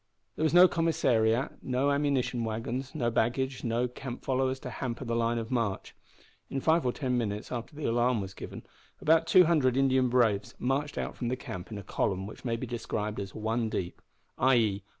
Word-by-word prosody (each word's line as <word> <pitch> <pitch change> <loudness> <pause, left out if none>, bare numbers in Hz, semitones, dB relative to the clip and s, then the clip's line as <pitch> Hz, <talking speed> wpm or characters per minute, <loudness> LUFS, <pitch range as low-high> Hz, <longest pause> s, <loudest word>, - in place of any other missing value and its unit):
There - - -6
was 155 - +3
no 180 +1 +9
commissariat, 130 -9 +1
no 130 +2 +1
ammunition 140 -4 0
wagons, 115 +5 -4
no 120 -6 0
baggage, 130 +4 0
no 120 +1 0
camp 125 0 -8
followers 130 0 0
to 125 - -6
hamper 125 +2 -4
the 115 -1 -1
line 115 0 +1
of 115 +1 -4
march. 115 -6 -1 0.6
In 135 - -2
five 160 0 +2
or - - +2
ten 125 -2 -1
minutes 105 -2 -3
after 120 +4 -5
the 150 - -5
alarm 120 0 +2
was 95 -1 -5
given - - -8 0.4
about 160 +1 +3
two 180 +2 +7
hundred 145 -7 +2
Indian 130 -2 +3
braves 115 -5 +2
marched 140 +3 -1
out - - -3
from 120 - -3
the 125 - 0
camp 90 -7 -7
in 105 - -5
a 100 - -7
column 95 0 -1
which 105 - -10
may 120 -3 -1
be 115 - -4
described 110 -3 -3
as 95 -1 -6
one 110 +1 -1
deep 90 -4 -4 0.4
i.e. 115 -6 +3
125 Hz, 195 wpm, -29 LUFS, 115-135 Hz, 0.6 s, no